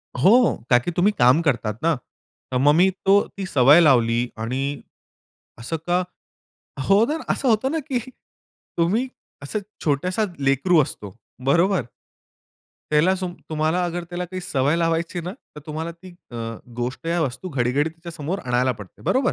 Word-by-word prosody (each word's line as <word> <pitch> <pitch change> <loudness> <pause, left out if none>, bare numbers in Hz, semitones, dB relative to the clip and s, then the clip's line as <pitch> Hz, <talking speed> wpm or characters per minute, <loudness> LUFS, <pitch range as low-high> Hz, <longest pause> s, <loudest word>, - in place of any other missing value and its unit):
हो, 215 - +5
का 120 - +6
की 175 +8 -4
तुम्ही 180 +5 +2
काम 125 +7 +5
करतात 115 -8 -1
ना. 165 -1 +3 0.6
तर 125 - +1
मग 145 +3 +5
मी 185 +3 +5 0.2
तो 200 +1 +6 0.2
ती 195 - -3
सवय 145 -1 +6
लावली 120 -6 +4 0.2
आणि 125 +4 -2 1.0
असं 125 +8 -3
का 180 +1 +2 0.9
हो 200 +3 +6
ना, 300 +4 -1 0.2
असं 270 - -1
होतं 230 +3 +2
ना, 325 - 0
की 270 -3 -2 0.8
तुम्ही 210 +10 +1 0.3
असं 145 +9 -3 0.3
छोटासा 180 +8 +1
लेकरू 140 +5 +3
असतो. 100 -7 -7 0.3
बरोबर? 175 +6 +3 1.1
त्याला 155 +5 +4
सो 185 0 -3 0.2
तुम्हाला 155 +3 +1
अगर 175 0 -3
त्याला 175 0 -3
काही 185 +1 -6
सवय 145 -1 0
लावायची 165 +1 0
ना, 175 +2 -5 0.2
तर - - -7
तुम्हाला 160 +2 -4
ती 185 +2 -14 0.2
अ, 120 - -8 0.4
गोष्ट 125 +6 -4
या 170 +1 0
वस्तू 140 +6 -4
घडी-घडी 140 +1 0
तिच्यासमोर 165 +1 -5
आणायला 125 +1 +1
पडते. 105 -4 -13
बरोबर? 260 0 +1
165 Hz, 155 wpm, -22 LUFS, 135-185 Hz, 1.1 s, का